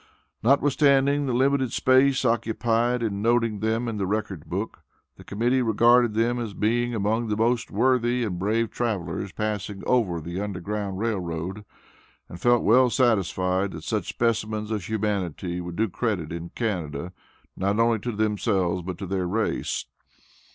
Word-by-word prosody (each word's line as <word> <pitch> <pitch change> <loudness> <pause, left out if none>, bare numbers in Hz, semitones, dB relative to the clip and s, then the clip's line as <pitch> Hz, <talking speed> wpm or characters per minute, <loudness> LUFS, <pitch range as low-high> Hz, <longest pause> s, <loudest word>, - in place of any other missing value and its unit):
Notwithstanding 140 +2 +3
the - - 0
limited 130 0 +2
space 130 +1 +3
occupied 115 +1 +1
in 100 -3 -2
noting 115 -2 +1
them 110 +3 0
on 115 -2 -3
the 95 -2 -1
record 100 -5 -3
book, 100 +5 -4 0.4
the - - -14
Committee 120 +5 0
regarded 120 0 +4
them 120 +2 +1
as 110 -4 -5
being 120 +3 0
among 110 +3 0
the 105 -1 -1
most 115 +1 +1
worthy 125 +2 +2
and 90 -6 -3
brave 110 +4 0
travelers 100 -4 -3
passing 105 -1 -4
over 105 -9 +1
the 85 +4 -5
Underground 100 0 -4
Rail 110 -1 -1
Road, 90 +4 -5 0.6
and 85 - -10
felt 120 -1 +4
well 125 +3 +5
satisfied 95 -6 +1
that 80 -1 -8
such 105 -3 -2
specimens 110 -2 -1
of 105 -5 -2
humanity 95 -5 -2
would 85 -1 -6
do 110 +4 +1
credit 95 -5 -2
in 85 0 -6
Canada, 90 -5 -3 0.4
not 100 +3 0
only 115 -1 +3
to 120 +4 -3
themselves, 105 -4 0
but 90 0 -6
to 100 - -5
their 95 -1 -2
race. 110 +5 -1
110 Hz, 155 wpm, -25 LUFS, 95-120 Hz, 0.6 s, well